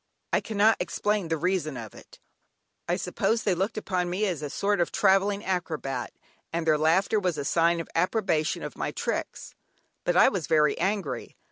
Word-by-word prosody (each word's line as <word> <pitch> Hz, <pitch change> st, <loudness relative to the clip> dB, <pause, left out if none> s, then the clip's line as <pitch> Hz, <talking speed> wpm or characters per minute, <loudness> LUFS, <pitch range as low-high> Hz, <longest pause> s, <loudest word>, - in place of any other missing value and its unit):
I -, -, +3 dB
cannot 220 Hz, 0 st, +3 dB
explain 205 Hz, +2 st, -1 dB
the 160 Hz, 0 st, 0 dB
reason 165 Hz, -5 st, -1 dB
of 110 Hz, -3 st, -8 dB
it; -, -, -15 dB, 0.7 s
I -, -, +1 dB
suppose 225 Hz, 0 st, -1 dB
they 195 Hz, -, +2 dB
looked 190 Hz, +6 st, -2 dB
upon 180 Hz, -4 st, -1 dB
me 190 Hz, +4 st, 0 dB
as 175 Hz, -7 st, -2 dB
a 150 Hz, -, -4 dB
sort 200 Hz, +4 st, 0 dB
of 170 Hz, -, 0 dB
travelling 200 Hz, +2 st, +2 dB
acrobat, 155 Hz, -8 st, -2 dB, 0.4 s
and 170 Hz, 0 st, -2 dB
their 155 Hz, -2 st, +3 dB
laughter 185 Hz, +7 st, +3 dB
was 180 Hz, -5 st, -1 dB
a 145 Hz, -, -3 dB
sign 170 Hz, +2 st, +2 dB
of 165 Hz, -, -5 dB
approbation 180 Hz, -3 st, 0 dB
of -, -, -6 dB
my -, -, -2 dB
tricks. -, -, -4 dB, 0.5 s
But -, -, +1 dB
I -, -, +7 dB
was 195 Hz, -10 st, -1 dB
very 150 Hz, -1 st, +3 dB
angry. 195 Hz, -3 st, -2 dB
180 Hz, 180 wpm, -27 LUFS, 160-200 Hz, 0.7 s, I